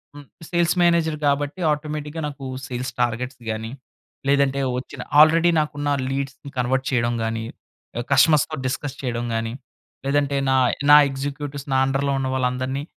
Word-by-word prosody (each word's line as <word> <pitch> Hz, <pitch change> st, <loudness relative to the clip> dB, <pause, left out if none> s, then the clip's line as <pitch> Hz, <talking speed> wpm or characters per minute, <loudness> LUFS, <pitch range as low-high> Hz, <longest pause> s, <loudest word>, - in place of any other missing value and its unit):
హ్మ్. 145 Hz, 0 st, -11 dB, 0.3 s
Sales 170 Hz, 0 st, +2 dB
manager 165 Hz, -2 st, +2 dB
కాబట్టి, 145 Hz, +5 st, 0 dB
ఆటోమేటిక్‌గా 150 Hz, +1 st, -5 dB
నాకు 140 Hz, -2 st, -9 dB, 0.2 s
సేల్స్ 125 Hz, +1 st, -4 dB
టార్గెట్స్ 120 Hz, +2 st, -2 dB
గాని, 110 Hz, +1 st, -5 dB, 0.6 s
లేదంటే 140 Hz, -1 st, +2 dB, 0.2 s
వచ్చిన 130 Hz, -, -7 dB, 0.2 s
ఆల్రెడీ 165 Hz, +2 st, +6 dB
నాకున్న 145 Hz, -1 st, -2 dB, 0.2 s
లీడ్స్‌ని 135 Hz, +1 st, -4 dB
కన్వర్ట్ 130 Hz, +2 st, 0 dB
చేయడం 120 Hz, -1 st, +1 dB
గాని, 115 Hz, 0 st, -2 dB, 0.6 s
ఎ -, -, 0 dB
కస్టమర్స్‌తో 155 Hz, +3 st, +4 dB
డిస్కస్ 140 Hz, +1 st, -3 dB
చేయడం 120 Hz, -2 st, -2 dB
గాని, 115 Hz, 0 st, -2 dB, 0.5 s
లేదంటే 140 Hz, 0 st, +1 dB
నాయ్ 130 Hz, -2 st, +3 dB, 0.2 s
నా 150 Hz, -, +11 dB
ఎగ్జిక్యూటివ్స్, 140 Hz, +1 st, -5 dB
నా -, -, +3 dB
అండర్‌లో 135 Hz, +1 st, 0 dB
ఉన్న 130 Hz, -, -1 dB
వాళ్ళందరిని 130 Hz, +2 st, -1 dB
140 Hz, 140 wpm, -22 LUFS, 130-145 Hz, 0.6 s, నా